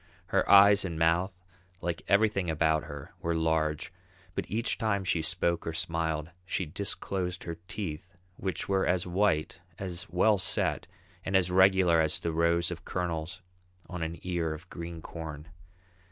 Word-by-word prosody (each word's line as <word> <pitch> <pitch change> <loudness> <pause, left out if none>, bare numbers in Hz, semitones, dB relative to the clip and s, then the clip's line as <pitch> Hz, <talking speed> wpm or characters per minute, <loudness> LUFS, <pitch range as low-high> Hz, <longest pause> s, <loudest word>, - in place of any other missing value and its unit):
Her - - +1
eyes 100 0 +8
and 85 -4 -4
mouth, 85 +4 +2 0.5
like 85 -2 -3
everything 100 -3 +3
about 80 -1 +2
her, 70 -1 -9
were 85 0 0
large, 80 0 0 0.4
but - - -4
each 115 +4 -1
time 110 -4 +1
she 90 -3 +1
spoke 85 +1 0
or 80 - -2
smiled, 80 -2 -1
she 95 0 -2
disclosed 90 +1 -3
her 85 -1 -6
teeth, 90 -3 -5 0.3
which 95 0 -3
were 95 -1 +1
as 90 0 +1
white, 90 -4 +1 0.2
as 90 -2 -4
well 95 +4 +3
set, 95 - 0 0.4
and 95 - -2
as 90 -1 +3
regular 95 -3 +5
as 80 -1 +1
the 85 - -2
rows 85 +1 +2
of 85 -1 -6
kernels 85 0 -3 0.4
on 90 -2 -6
an 80 +1 -3
ear 85 -3 -1
of 85 +4 -13
green 85 -1 -7
corn. 80 -2 -7
85 Hz, 155 wpm, -29 LUFS, 80-95 Hz, 0.5 s, eyes